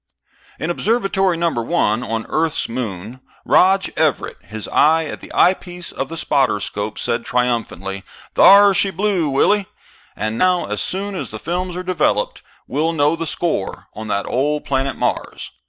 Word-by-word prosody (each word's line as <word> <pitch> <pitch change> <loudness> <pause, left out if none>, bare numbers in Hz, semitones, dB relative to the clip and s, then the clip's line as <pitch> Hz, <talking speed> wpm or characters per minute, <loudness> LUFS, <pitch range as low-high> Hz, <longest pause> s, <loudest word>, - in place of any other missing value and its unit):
In 160 +3 -2
Observatory 195 -3 +1
No. 170 0 +1
1 115 -2 0
on 115 -2 -3
Earth's 160 -1 0
moon, 115 -1 -5 0.3
Rog 190 +1 +4
Everett, 155 -4 0
his 110 -1 -7
eye 160 +2 +4
at - - -6
the - - -11
eyepiece 180 -1 +1
of 135 - -4
the 165 - -6
spotter 135 -8 +1
scope, 105 +1 -4
said 115 0 -1
triumphantly, 115 -6 -2 0.3
"Thar 200 0 +7
she 195 +1 +2
blew, 190 -3 0
Willie. 195 +9 +2 0.5
And 110 +1 -3
now, 180 -1 +3
as - - -3
soon 200 +2 -3
as 185 - -4
the - - -7
films 180 +1 -3
are 180 - -4
developed, 175 - 0 0.2
we'll 155 +5 -1
know 150 0 +2
the 165 0 -4
score 160 - -3
on 110 0 -7
that 100 -1 -1
old 145 +4 -1
planet 135 -1 -1
Mars." - - -3
155 Hz, 160 wpm, -19 LUFS, 115-180 Hz, 0.5 s, Thar